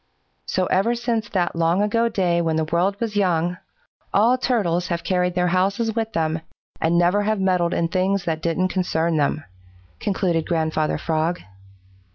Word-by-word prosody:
"So 185 - 0
ever 195 +7 +1
since 230 -3 -2
that 175 -3 -1
long 170 +4 +2
ago 230 +3 +1
day 180 -5 +1
when 165 -1 0
the 160 - +1
world 175 +5 0
was 225 -3 -3
young, 175 -3 +1 0.5
all 230 +5 +4
Turtles 210 -9 0
have 170 -1 -3
carried 180 0 0
their 180 0 +2
houses 200 +5 0
with 225 -1 -2
them 160 -3 -1 0.4
and 165 +1 +2
never 175 +4 +3
have 215 0 0
meddled 180 -3 +1
in 165 - +1
things 185 +2 0
that 160 -1 -2
don't 170 +3 0
concern 170 -3 0
them," 150 +1 0 0.6
concluded 180 -5 0
Grandfather 160 -2 0
Frog. 165 +2 -1
180 Hz, 165 wpm, -22 LUFS, 165-205 Hz, 0.6 s, all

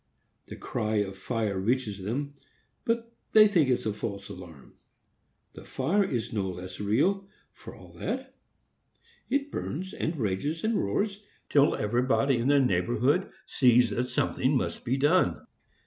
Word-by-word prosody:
The - - -8
cry 110 0 -2
of 100 -2 0
fire 105 -1 -2
reaches 105 -1 -1
them, 140 +9 -3 0.5
but 230 0 -1 0.2
they 215 -1 +8
think 170 -9 +3
it 125 - +1
a 110 - 0
false 100 -2 -5
alarm. 85 -7 -11 0.8
The - - -11
fire 170 +11 +1
is 120 - -3
no 100 -3 -1
less 90 +1 -8
real, 150 - +1 0.3
for - - -12
all - - -15
that. - - -4 1.0
It 285 +1 0
burns, 185 +6 -4
and 160 +1 -2
rages, 120 - -2
and 220 +1 +1
roars, 200 - -1 0.3
till 145 0 +4
everybody 125 +4 +1
in 120 - 0
the 145 0 +5
neighborhood 125 - +1 0.2
sees 125 -3 +4
that 120 +4 -1
something 130 +2 +1
must - - -3
be 130 +2 0
done. 150 +7 +2
125 Hz, 145 wpm, -28 LUFS, 105-160 Hz, 1.0 s, they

